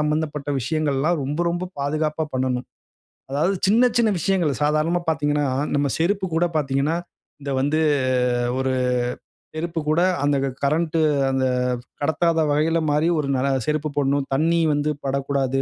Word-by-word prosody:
சம்பந்தப்பட்ட 150 -1 -1
விஷயங்கள்லாம் 155 +3 0
ரொம்ப 150 +5 -2
ரொம்ப 175 +1 -3
பாதுகாப்பா 155 +2 -1
பண்ணணும். 130 -1 -1 0.7
அதாவது 170 +8 +1
சின்ன 240 +5 +5
சின்ன 225 -2 +4
விஷயங்கள் 170 -7 0
சாதாரணமா 155 +4 +1
பார்த்தீங்கன்னா, 145 -2 0 0.3
நம்ம 145 0 +1
செருப்பு 190 +3 +1
கூட 170 - +3
பார்த்தீங்கன்னா 140 +3 0 0.5
இது 140 - -3
வந்து 150 +3 +1 0.8
ஒரு 130 0 0 0.8
செருப்பு 165 +1 -3
கூட 155 +2 +3 0.2
அந்த 145 -1 +2 0.3
கரண்ட் 160 +3 +1 0.3
அந்த 130 0 0 0.6
கடத்தாத 160 +2 +1
வகையில 160 +3 +2
மாறி 150 +2 +2
ஒரு 145 - -1
நல்ல 135 +2 +1 0.2
செருப்பு 155 0 0
போடணும். 140 0 +1
தண்ணீர் 165 +2 +2
வந்து 145 +1 0
படக்கூடாது. 135 -1 0
150 Hz, 130 wpm, -22 LUFS, 140-165 Hz, 0.8 s, சின்ன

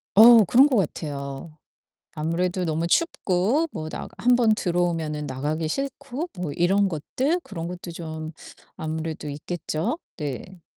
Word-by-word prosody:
어 230 +1 +10
그런 260 +9 +6
것 255 -5 +2
같아요. 145 -2 -3 0.6
아무래도 175 +3 -1
너무 165 +1 0
춥고 245 - +2
뭐 155 0 -5
나가 - - -6
1 245 +1 +4
번 225 -3 +4
들어 175 -3 0
오면은 155 -4 -1
나가기 150 +5 -2
싫고 275 - -4
뭐 165 -5 -2
이런 195 +4 +3
것들 260 - -1
그런 170 -4 -6
것도 175 -1 -7
좀 160 -1 -6 0.4
아무래도 160 -1 -4
있겠죠? 160 - -3 0.2
네. 160 +4 -6
170 Hz, 260 characters per minute, -25 LUFS, 155-215 Hz, 0.6 s, 어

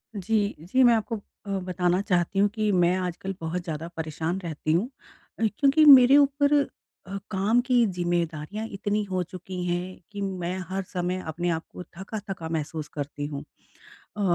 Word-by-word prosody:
जी, 205 +1 0
जी। 195 +11 +2
मैं 240 -1 +7
आपको 225 +1 0 0.3
अ, - - -8
बताना 180 0 0
चाहती 185 -1 0
हूँ 205 - +5
कि 215 0 0
मैं 180 -1 +3
आजकल 185 +1 -3
बहुत 165 +2 -3
ज़्यादा 160 -1 -4
परेशान 160 +3 -2
रहती 155 -2 -2
हूँ 190 +9 +1 0.5
अ, - - -1 0.2
क्योंकि 290 +2 +5
मेरे 270 -1 +9
ऊपर 285 0 +3 0.5
अ, 195 +1 -4
काम 205 +4 +2
की 245 -1 +3
ज़िम्मेदारियाँ 175 +1 -2
इतनी 205 +1 -1
हो 185 -1 0
चुकी 180 +1 -7
हैं 180 +1 -2
कि 205 - -6
मैं 185 -2 -3
हर 195 +1 -2
समय 180 +1 -1
अपने 175 +3 -2
आप 165 -1 -1
को - - -8
थका-थका 190 -2 -7
महसूस 155 -1 -3
करती 145 0 -4
हूँ। 140 -2 -6 0.7
अ, - - -2
185 Hz, 165 wpm, -26 LUFS, 170-210 Hz, 0.7 s, मेरे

